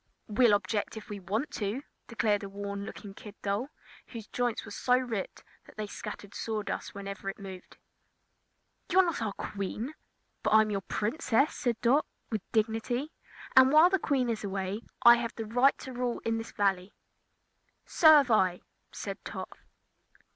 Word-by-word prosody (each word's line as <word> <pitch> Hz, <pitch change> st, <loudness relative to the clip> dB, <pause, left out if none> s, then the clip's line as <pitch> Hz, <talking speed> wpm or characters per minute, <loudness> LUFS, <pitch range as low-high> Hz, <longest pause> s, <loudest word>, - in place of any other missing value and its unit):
"We'll 220 Hz, 0 st, +5 dB
object 205 Hz, +1 st, -2 dB
if 220 Hz, 0 st, -9 dB
we 205 Hz, -, -5 dB
want 210 Hz, -, -2 dB
to!" 215 Hz, +6 st, -3 dB, 0.2 s
declared 215 Hz, -3 st, +1 dB
a 200 Hz, -, -6 dB
worn 200 Hz, 0 st, -5 dB
looking 200 Hz, -2 st, -9 dB
kid 210 Hz, 0 st, -11 dB
doll, 205 Hz, +7 st, -1 dB, 0.4 s
whose 230 Hz, -3 st, -8 dB
joints 245 Hz, +1 st, -2 dB
were 215 Hz, -, -10 dB
so 250 Hz, +4 st, +2 dB
ripped 235 Hz, -6 st, -4 dB, 0.2 s
that -, -, -17 dB
they 215 Hz, -, -2 dB
scattered 205 Hz, 0 st, -8 dB
sawdust 215 Hz, -3 st, -4 dB
whenever 200 Hz, 0 st, -5 dB
it 195 Hz, -, -6 dB
moved. 190 Hz, -2 st, -10 dB, 1.1 s
"You're 375 Hz, 0 st, +5 dB
not 335 Hz, -8 st, -2 dB
our 215 Hz, -3 st, -1 dB
Queen." 210 Hz, +9 st, -4 dB, 0.5 s
"But -, -, +2 dB
I'm 215 Hz, -1 st, +5 dB
your 200 Hz, -1 st, -1 dB
Princess," 230 Hz, -, 0 dB
said 240 Hz, -3 st, -1 dB
Dot, 270 Hz, +6 st, +3 dB, 0.2 s
with 215 Hz, -3 st, -1 dB
dignity, 225 Hz, +6 st, 0 dB, 0.4 s
"and 260 Hz, 0 st, +8 dB
while 315 Hz, +4 st, +7 dB
the 385 Hz, -, +3 dB
Queen 270 Hz, -6 st, +1 dB
is 225 Hz, -2 st, -2 dB
away 195 Hz, +1 st, -3 dB, 0.2 s
I 235 Hz, 0 st, +9 dB
have 235 Hz, -1 st, -4 dB
the 225 Hz, -, -4 dB
right 245 Hz, +5 st, +3 dB
to 260 Hz, -, -8 dB
rule 245 Hz, -1 st, -2 dB
in 225 Hz, 0 st, 0 dB
this 225 Hz, -, -7 dB
Valley." 195 Hz, -1 st, 0 dB, 0.9 s
"So 325 Hz, -, +3 dB
have 275 Hz, -5 st, +4 dB
I," 185 Hz, -4 st, +3 dB, 0.3 s
said -, -, -6 dB
Tot. -, -, -7 dB
220 Hz, 165 wpm, -30 LUFS, 200-245 Hz, 1.1 s, I